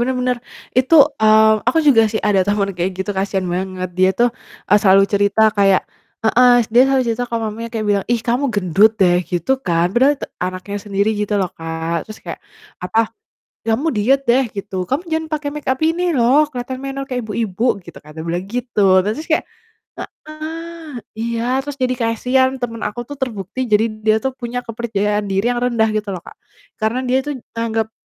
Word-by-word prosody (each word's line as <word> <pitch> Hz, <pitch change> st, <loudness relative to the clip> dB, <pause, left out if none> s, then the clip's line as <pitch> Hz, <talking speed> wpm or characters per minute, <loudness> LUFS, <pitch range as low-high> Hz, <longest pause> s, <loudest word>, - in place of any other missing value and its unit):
bener 255 Hz, +2 st, 0 dB
bener, 250 Hz, -1 st, 0 dB, 0.4 s
itu 260 Hz, +5 st, +3 dB, 0.3 s
mmm, 220 Hz, 0 st, +5 dB
aku 325 Hz, -, +3 dB
juga 230 Hz, -6 st, +6 dB
sih 220 Hz, -, -1 dB
ada 195 Hz, -2 st, +3 dB
temen 205 Hz, -1 st, +1 dB
kayak 180 Hz, +2 st, 0 dB
gitu 190 Hz, +2 st, -2 dB
kasian 190 Hz, -1 st, -1 dB
banget 185 Hz, 0 st, -3 dB
dia 185 Hz, 0 st, +5 dB
tuh, 240 Hz, -, +5 dB, 0.4 s
eee, 205 Hz, -, +5 dB
selalu 195 Hz, -1 st, +6 dB
cerita 200 Hz, +1 st, +2 dB, 0.2 s
kayak 195 Hz, -2 st, +4 dB, 0.4 s
heeh, 250 Hz, +3 st, +5 dB, 0.2 s
dia 245 Hz, +2 st, +7 dB
selalu 270 Hz, -1 st, +2 dB
cerita 230 Hz, +2 st, -1 dB
ke -, -, -3 dB
mamanya 225 Hz, +2 st, -5 dB
kayak 220 Hz, -2 st, -2 dB
bilang, 200 Hz, -1 st, +1 dB
"Ih, 235 Hz, -, +2 dB
kamu 245 Hz, +4 st, +1 dB
gendut 200 Hz, +2 st, +4 dB
deh," 175 Hz, -2 st, +5 dB
gitu 175 Hz, +5 st, -2 dB, 0.2 s
kan 170 Hz, 0 st, +2 dB
padahal 270 Hz, +4 st, +4 dB
te -, -, -5 dB, 0.2 s
anaknya 185 Hz, +2 st, -4 dB
sendiri 200 Hz, +1 st, 0 dB
gitu 210 Hz, 0 st, -2 dB
loh 185 Hz, -, +1 dB
Kak, 165 Hz, 0 st, -4 dB, 0.2 s
terus 215 Hz, -, -9 dB
kayak -, -, -6 dB, 0.5 s
apa, 220 Hz, -, -1 dB, 0.7 s
"Kamu 255 Hz, +9 st, +1 dB
diet 255 Hz, +7 st, +3 dB
deh," 260 Hz, +3 st, +5 dB
gitu. 200 Hz, -1 st, -6 dB
"Kamu 270 Hz, +5 st, 0 dB
jangan 320 Hz, 0 st, 0 dB
pakai 295 Hz, -1 st, -2 dB
make 300 Hz, -1 st, -7 dB
up 260 Hz, -, -13 dB
ini 330 Hz, +3 st, +1 dB
loh 265 Hz, +6 st, +4 dB
keliatan 255 Hz, -1 st, -5 dB
menor 275 Hz, 0 st, -4 dB
kayak 250 Hz, -1 st, -2 dB
ibu-ibu," 220 Hz, 0 st, -2 dB, 0.2 s
gitu 170 Hz, -, -12 dB
kan, 150 Hz, +1 st, -15 dB
dia 160 Hz, -, -6 dB
bilang 175 Hz, +3 st, -2 dB
gitu. 240 Hz, +1 st, -4 dB, 0.2 s
Nah 200 Hz, -, -2 dB
terus 310 Hz, +8 st, -6 dB
tuh 325 Hz, -, -7 dB
kayak -, -, -31 dB, 0.6 s
heeh, 320 Hz, -1 st, -8 dB, 0.2 s
iya 230 Hz, 0 st, -2 dB, 0.2 s
terus 285 Hz, 0 st, -7 dB
jadi 255 Hz, 0 st, +1 dB
kasian, 255 Hz, +3 st, +1 dB
temen 230 Hz, -2 st, -4 dB
aku 225 Hz, +3 st, -7 dB
tuh 285 Hz, +1 st, -9 dB
terbukti 225 Hz, -2 st, -4 dB
jadi 215 Hz, +1 st, +4 dB, 0.2 s
dia 215 Hz, 0 st, +5 dB
tuh 265 Hz, -1 st, -1 dB
punya 245 Hz, -1 st, -4 dB
kepercayaan 210 Hz, -3 st, -1 dB
diri 195 Hz, +3 st, 0 dB
yang 240 Hz, -, -3 dB
rendah 235 Hz, -3 st, +2 dB
gitu 210 Hz, -1 st, -2 dB
loh 180 Hz, -3 st, -5 dB
Kak, -, -, -11 dB, 0.5 s
karena 220 Hz, +4 st, 0 dB
dia 255 Hz, +1 st, +2 dB
tuh 290 Hz, -1 st, -5 dB, 0.2 s
anggap 225 Hz, -1 st, -2 dB
225 Hz, 195 wpm, -18 LUFS, 200-255 Hz, 0.7 s, dia